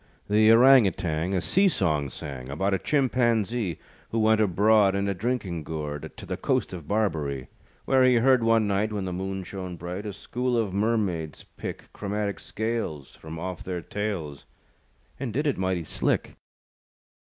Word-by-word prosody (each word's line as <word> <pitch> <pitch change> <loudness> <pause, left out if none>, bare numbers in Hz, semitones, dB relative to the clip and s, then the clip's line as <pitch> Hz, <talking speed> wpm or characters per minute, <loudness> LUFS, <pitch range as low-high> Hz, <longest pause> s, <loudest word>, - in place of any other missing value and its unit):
The 110 +1 +5
Orang 125 -1 +7
Outang 85 +1 -1
A 90 - +1
sea 195 - +3
song 75 - +1
sang, 65 -1 -7
About 95 +8 0
a 95 - +1
Chimpanzee 120 - +1 0.3
Who 115 - -2
went 110 0 +4
abroad, 105 +1 +4
In 100 0 0
a 100 - +1
drinking 100 -4 -2
gourd, 75 -1 -5
To - - -8
the - - -4
coast - - 0
of 85 -5 -8
Barberee. 75 -11 -1 0.4
Where 130 -1 +4
he 130 -1 +5
heard 125 +1 +4
one 115 -1 +4
night, 100 +2 0
When 100 -3 -3
the 90 - -3
moon 95 +1 -3
shone 90 -1 -6
bright, 90 +5 -6
A 105 - -4
school 120 +5 -2
of 105 -5 0
mermaids 100 -7 -1
pick - - -7
Chromatic 100 -2 -3
scales 110 - -4
From 80 +1 -9
off 90 +1 -5
their 90 -2 -4
tails, 95 -9 -4 0.7
And 130 -3 -3
did 145 +8 -1
it 145 -8 0
mighty 95 -2 0
slick. - - -1
100 Hz, 165 wpm, -26 LUFS, 85-110 Hz, 0.7 s, Orang